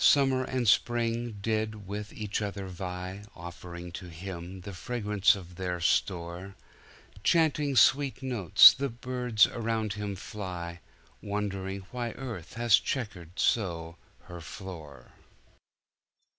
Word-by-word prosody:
Summer 135 -2 +5
and 130 -2 -1
spring 115 0 +2
did 110 -1 -1
with 105 +2 -5
each 105 0 -3
other 100 -1 -4
vie, 90 +1 -5
Offering 85 0 -8
to 90 +1 -8
Him 90 +2 -7
the 100 +2 -8
fragrance 105 -1 +2
of 90 -3 -11
their 90 -2 -2
store; 85 +2 -1 0.7
Chanting 150 -2 +3
sweet 135 +2 +4
notes, 120 -10 +8
the 140 +1 -2
birds 125 -2 +2
around 110 -2 -2
him 105 -1 -4
fly, 90 -3 -6 0.4
Wondering 100 -2 -3
why 120 -2 -3
earth 115 -12 -7
had 120 0 -2
checkered 100 - +1
so 85 -6 0 0.3
her 85 -1 -9
floor. 80 -5 -9
100 Hz, 115 wpm, -29 LUFS, 90-115 Hz, 0.7 s, notes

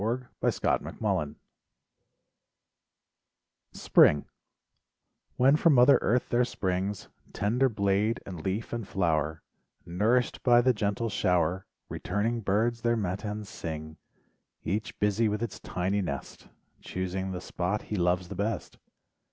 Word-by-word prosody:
LIFE 120 +4 -1 0.2
WAVES - - +1
37 - - +1
THE - - -8
SEASONS 75 -1 -1 2.4
SPRING 75 -1 +4 1.1
When 135 +3 +5
from 155 -1 +4
mother 125 +3 +7
earth 125 +2 +1
there 120 +1 +3
springs 95 -3 -2 0.3
Tender 120 +6 +1
blade 105 +1 +1
and 90 -4 -7
leaf 100 +5 -3
and 115 -4 -4
flower 80 -4 0 0.4
Nourished 110 +8 +1
by 120 -1 +5
the 130 +1 +3
gentle 105 +1 -1
shower, 90 -1 0 0.2
Returning 115 +3 -2
birds 110 +4 +1
th 120 0 +2
dr - - -2
matins 105 +1 -3
sing, 80 -3 -6 0.7
Each 105 +5 -3
busy 105 +2 +2
with 105 +2 -2
its 115 - -5
tiny 95 +3 -1
nest, 70 -7 -6 0.3
Choosing 95 +1 -4
the 90 - -4
.spot 90 +3 -2
he 105 - -4
loves 90 -1 +1
the 100 - -6
best. 105 +1 -3
100 Hz, 130 wpm, -28 LUFS, 90-115 Hz, 2.4 s, mother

